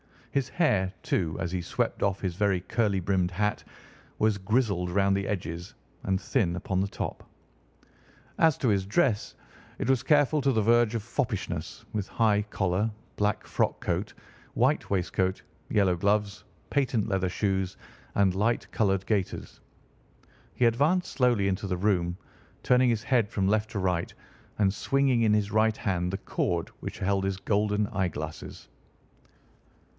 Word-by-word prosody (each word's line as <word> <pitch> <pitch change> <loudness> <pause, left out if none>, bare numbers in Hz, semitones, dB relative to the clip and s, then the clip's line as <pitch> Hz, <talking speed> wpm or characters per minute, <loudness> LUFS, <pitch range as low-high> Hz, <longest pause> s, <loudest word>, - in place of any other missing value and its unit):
His 140 -4 0
hair, 105 - +1
too, 80 -3 0
as 85 -2 -2
he 90 -1 -2
swept - - -2
off 100 -1 0
his 90 -3 -2
very 95 -2 +1
curly 100 -1 0
brimmed 90 -1 +1
hat, 105 +3 -1 0.5
was 110 -1 +2
grizzled 100 -3 +1
round 100 +1 +2
the 100 0 -1
edges 85 -3 -4 0.3
and 95 0 0
thin 95 -7 0
upon 95 +1 -2
the 95 - +1
top. - - -6 1.1
As 160 -3 +4
to 125 - +2
his 100 -2 +1
dress, 105 - +1 0.4
it - - -2
was 130 -3 +3
careful 150 0 +3
to 135 -1 +2
the 110 - +2
verge 115 +1 +3
of 110 - -2
foppishness, 115 -2 -3
with 105 -2 -2
high 105 -2 +2
collar, 100 0 0 0.3
black 105 -1 0
frock - - -1
coat, - - -2 0.4
white - - +1
waistcoat, 95 0 0 0.3
yellow 95 -4 +2
gloves, 100 +2 0 0.3
patent 125 -6 +1
leather 95 -2 0
shoes, 95 -1 -1 0.4
and 100 -2 +3
light 110 +5 0
coloured 95 -3 +1
gaiters. 100 -4 -2 1.0
He 125 - +3
advanced 145 +11 +2
slowly 120 -7 +2
into 100 +1 -2
the 90 -1 -1
room, 90 -3 +1 0.5
turning 125 0 +4
his 115 -2 0
head 120 -6 +2
from 95 -4 0
left 110 +1 +1
to 105 - -3
right, 90 -2 0 0.5
and 100 -2 +2
swinging 135 +1 +2
in 110 -1 +4
his 105 0 +1
right 110 +1 +3
hand 90 -3 -1
the 95 - -2
cord - - -2
which - - -7
held 95 0 0
his 95 -1 -1
golden 105 +1 +1
eyeglasses. 85 -8 -4
100 Hz, 155 wpm, -28 LUFS, 95-115 Hz, 1.1 s, As